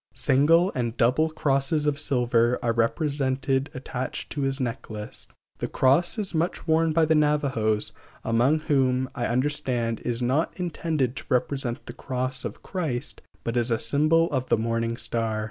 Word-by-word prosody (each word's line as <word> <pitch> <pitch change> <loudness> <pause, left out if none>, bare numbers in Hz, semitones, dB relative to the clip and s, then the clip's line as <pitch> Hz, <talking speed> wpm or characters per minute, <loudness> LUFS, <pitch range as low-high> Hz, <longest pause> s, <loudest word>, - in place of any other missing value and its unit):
Single 165 +7 +4
and 120 -2 -2
double 130 +7 +3
crosses 150 -1 +1
of 145 -1 +1
silver 125 -4 +2
are 115 -1 +1
represented 135 +2 0
attached 130 0 -5
to 145 - -3
his 135 0 0
necklace. 115 -4 -5 0.3
The - - -2
cross 140 - +2
is 205 -4 -3
much 165 +2 -1
worn 160 0 +3
by 160 +1 +3
the 160 - +3
Navajos, 140 -8 +1 0.3
among 125 +7 +2
whom, 130 -4 +1
I 120 -3 -2
understand, 125 -3 0
it - - -9
is 120 -1 -1
not 130 +9 0
intended 160 -7 -1
to - - -7
represent 130 -1 -1
the - - -8
"Cross 130 0 -3
of - - -6
Christ," 150 -9 -3 0.2
but 115 - -3
is 120 0 +2
a 115 - +2
symbol 155 +8 +3
of 130 -2 -2
the - - +4
morning 115 +1 -1
star. 115 -3 -2
130 Hz, 165 wpm, -25 LUFS, 120-150 Hz, 0.3 s, Single